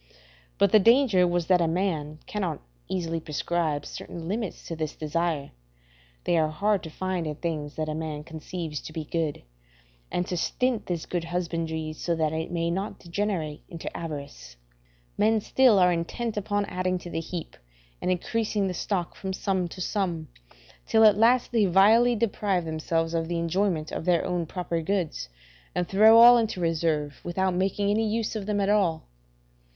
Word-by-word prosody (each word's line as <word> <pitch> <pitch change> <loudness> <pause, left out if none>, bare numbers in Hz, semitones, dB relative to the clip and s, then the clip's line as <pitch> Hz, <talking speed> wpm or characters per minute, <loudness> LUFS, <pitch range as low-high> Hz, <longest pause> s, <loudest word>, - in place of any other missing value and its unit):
But - - +3
the 215 - +7
danger 225 -4 +5
was 175 -1 0
that 180 -1 +4
a 165 - +2
man 160 -4 -1
cannot 185 -7 -3 0.3
easily 165 -3 -2
prescribe 155 -1 -2
certain 165 -1 -7
limits 210 +1 -4
to 165 - -4
this 155 -1 -4
desire 155 -1 -2 0.7
(they 170 - +2
are 155 - +3
hard 200 +6 +1
to 160 - -8
find 185 0 -3
in 150 - -3
things 155 -2 -4
that 155 0 -2
a 155 - -2
man 155 -1 -4
conceives 160 -1 -6
to 155 - -9
be 160 - -4
good), 160 -2 -2 0.7
and 180 - 0
to 180 - -3
stint 245 +7 -1
this 170 -3 -2
good 175 -2 -3
husbandry 165 -2 -3
so 170 +2 -2
that 155 -1 0
it 160 0 -3
may 170 -1 -1
not 195 +4 -3
degenerate 170 -4 -3
into 165 -1 -7
avarice: 140 - -7 0.6
men 220 +1 +4
still 245 +1 +4
are 180 -1 +5
intent 210 +7 -3
upon 205 0 -1
adding 185 -1 -1
to 175 -1 -9
the - - -2
heap 165 0 -6 0.5
and - - -1
increasing 210 +3 0
the 185 - -1
stock 180 0 -2
from 190 -1 -4
sum 190 -2 -1
to 185 +2 -9
sum, 175 -6 -2 0.6
till 220 - +4
at 210 -2 +7
last 235 +4 +3
they 225 -3 +3
vilely 220 +7 +5
deprive 200 -5 0
themselves 165 +1 -1
of 165 -1 -1
the 170 0 -2
enjoyment 170 -1 0
of - - -4
their 175 -2 +2
own 175 -3 -1
proper 170 -1 -3
goods, 165 - -2 0.5
and 180 -1 0
throw 215 +4 +7
all 240 +1 +9
into 220 -5 -1
reserve, 160 -3 0
without 185 +2 0
making 195 +2 0
any 220 +1 +1
use 225 0 -1
of 210 -2 -4
them 210 -1 0
at 195 - +1
all. 195 -6 +2
175 Hz, 175 wpm, -26 LUFS, 160-200 Hz, 0.7 s, all